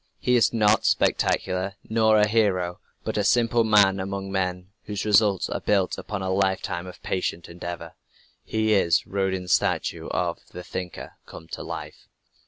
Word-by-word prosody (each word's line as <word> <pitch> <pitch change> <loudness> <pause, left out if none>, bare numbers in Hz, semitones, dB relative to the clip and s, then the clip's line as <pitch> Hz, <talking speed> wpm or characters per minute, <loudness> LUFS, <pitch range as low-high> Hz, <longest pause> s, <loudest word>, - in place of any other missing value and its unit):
He 125 - +1
is 120 - +4
not 110 -1 +3
spectacular, 95 +1 +1
nor 110 -1 +3
a 105 0 +4
"hero," 95 -5 +1 0.2
but - - -2
a - - +1
simple 115 +2 +3
man 100 -3 +4
among 95 0 -4
men, 90 -1 -2
whose 105 0 -4
results 105 -2 +3
are - - -3
built 100 -3 +1
upon 100 -2 -5
a 95 - -1
lifetime 95 -2 -1
of 90 - -12
patient 90 -2 -2
endeavor. 85 -1 -7 0.5
He 110 0 0
is 85 -5 +3
Rodin's 95 -2 -1
statue - - 0
of - - -2
"The 90 - -7
Thinker" 90 -1 -7
come 80 - -11
to - - -6
life. - - -8
95 Hz, 160 wpm, -25 LUFS, 90-105 Hz, 0.5 s, is